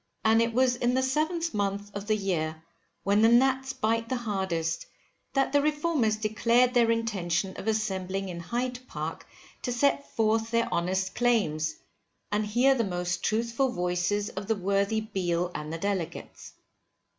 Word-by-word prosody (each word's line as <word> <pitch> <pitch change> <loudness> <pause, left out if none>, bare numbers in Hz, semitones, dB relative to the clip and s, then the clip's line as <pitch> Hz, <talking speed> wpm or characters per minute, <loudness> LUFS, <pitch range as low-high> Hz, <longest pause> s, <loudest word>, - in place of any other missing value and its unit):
And 225 +1 +5
it 230 0 +1
was 250 +1 +3
in 245 +1 +1
the 260 - +3
7th 315 +5 0
month 205 0 -2
of 200 0 -5
the 215 - +3
year, 160 -6 -2 0.4
when 200 +2 +3
the 225 - +6
gnats 265 +2 +3
bite 230 -3 -1
the 260 - 0
hardest, 190 -8 -2 0.5
that 270 0 +1
the 285 - +5
Reformers 295 -6 +1
declared 230 +3 +2
their 235 -2 +4
intention 195 -5 0
of - - -7
assembling 195 -3 -1
in 175 -2 -6
Hyde 245 +7 -3
Park - - -5 0.3
to 245 - -2
set 280 +3 +1
forth 225 0 +2
their 230 0 +1
honest 185 +2 0
claims, 160 -11 +1 0.6
and 210 0 0
hear 245 +6 +4
the 240 -3 +1
most 180 -2 -2
truthful 230 +4 +1
voices 180 +1 0
of 195 +1 -6
the 225 - +2
worthy 200 +3 +1
Beale 180 -5 -1
and 150 +1 -5
the 165 - -3
Delegates. 180 -3 -4
215 Hz, 160 wpm, -28 LUFS, 190-245 Hz, 0.6 s, the